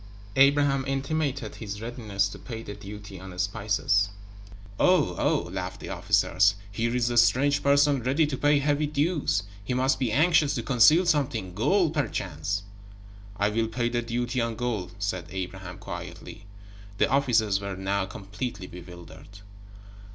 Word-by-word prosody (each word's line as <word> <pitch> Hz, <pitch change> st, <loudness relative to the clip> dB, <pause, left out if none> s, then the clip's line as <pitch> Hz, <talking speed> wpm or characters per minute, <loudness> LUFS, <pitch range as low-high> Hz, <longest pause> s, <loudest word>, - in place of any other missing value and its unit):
Abraham 140 Hz, 0 st, +4 dB
intimated 135 Hz, -3 st, -2 dB
his 105 Hz, -2 st, -6 dB
readiness 110 Hz, -4 st, -2 dB
to -, -, -10 dB
pay 115 Hz, -3 st, -7 dB
the 105 Hz, -, -7 dB
duty 100 Hz, -1 st, -9 dB
on 95 Hz, 0 st, -10 dB
spices. 100 Hz, +1 st, +1 dB, 0.7 s
"Oh, 180 Hz, -, +3 dB
Oh!" -, -, +1 dB
laughed -, -, -5 dB
the -, -, -8 dB
officers. 100 Hz, +4 st, +2 dB, 0.2 s
"Here 115 Hz, +4 st, -1 dB
is 120 Hz, -1 st, +1 dB
a 120 Hz, -, -1 dB
strange 130 Hz, +6 st, +4 dB
person 140 Hz, -1 st, +3 dB
ready 135 Hz, +6 st, +2 dB
to 145 Hz, -2 st, -3 dB
pay 145 Hz, +2 st, +3 dB
heavy 145 Hz, +1 st, +1 dB
dues. 145 Hz, -, 0 dB, 0.2 s
He 125 Hz, +5 st, -2 dB
must 130 Hz, +1 st, +2 dB
be 125 Hz, -4 st, 0 dB
anxious 155 Hz, +1 st, +3 dB
to 120 Hz, -, -2 dB
conceal 135 Hz, +9 st, +5 dB
something 125 Hz, -, 0 dB
gold, 165 Hz, -, +2 dB
perchance." 95 Hz, -, -2 dB, 0.7 s
"I 100 Hz, +1 st, +2 dB
will 110 Hz, +1 st, 0 dB
pay 120 Hz, +1 st, -1 dB
the 120 Hz, 0 st, -1 dB
duty 120 Hz, +1 st, -2 dB
on 115 Hz, -1 st, -2 dB
gold," 110 Hz, -8 st, -3 dB
said 95 Hz, -4 st, -3 dB
Abraham, 95 Hz, -1 st, -6 dB
quietly. 100 Hz, -, -9 dB, 0.5 s
The -, -, +3 dB
officers 115 Hz, -7 st, +2 dB
were 100 Hz, -1 st, -4 dB
now 95 Hz, 0 st, -1 dB
completely 100 Hz, +2 st, -6 dB
bewildered. 90 Hz, 0 st, -12 dB
115 Hz, 150 wpm, -26 LUFS, 100-140 Hz, 0.7 s, conceal